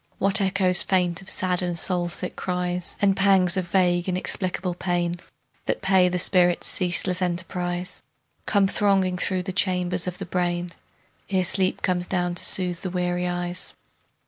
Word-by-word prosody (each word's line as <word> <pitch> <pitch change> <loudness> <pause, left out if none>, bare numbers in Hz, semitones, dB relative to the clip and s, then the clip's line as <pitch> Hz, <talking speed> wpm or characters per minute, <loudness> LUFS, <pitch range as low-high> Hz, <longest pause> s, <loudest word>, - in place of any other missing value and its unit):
What 195 +2 +4
echoes 185 -2 +1
faint 180 -1 0
of 190 - -10
sad 180 -1 +1
and 175 -1 -2
soul 175 0 -1
sick 180 +1 -3
cries, 180 -1 -3
And 195 -1 +3
pangs 195 -3 +5
of 185 -2 -2
vague 175 0 +1
inexplicable 185 0 -2
pain 175 -1 -2 0.5
That - - -2
pay 190 -2 +3
the 180 - -2
spirit's 175 -1 +3
ceaseless 180 0 +3
enterprise, 180 0 -2 0.5
Come 200 -2 +3
thronging 190 -3 +1
through 185 -1 -1
the 190 0 -5
chambers 180 -1 0
of 180 - -4
the - - -6
brain 175 -1 -2 0.6
Ere 190 -2 +1
sleep 185 +1 +1
comes 180 -1 0
down 180 -2 -1
to 175 - -3
soothe 180 -2 +1
the 185 - -4
weary 180 0 -2
eyes. 175 0 -3
180 Hz, 160 wpm, -24 LUFS, 175-185 Hz, 0.6 s, pangs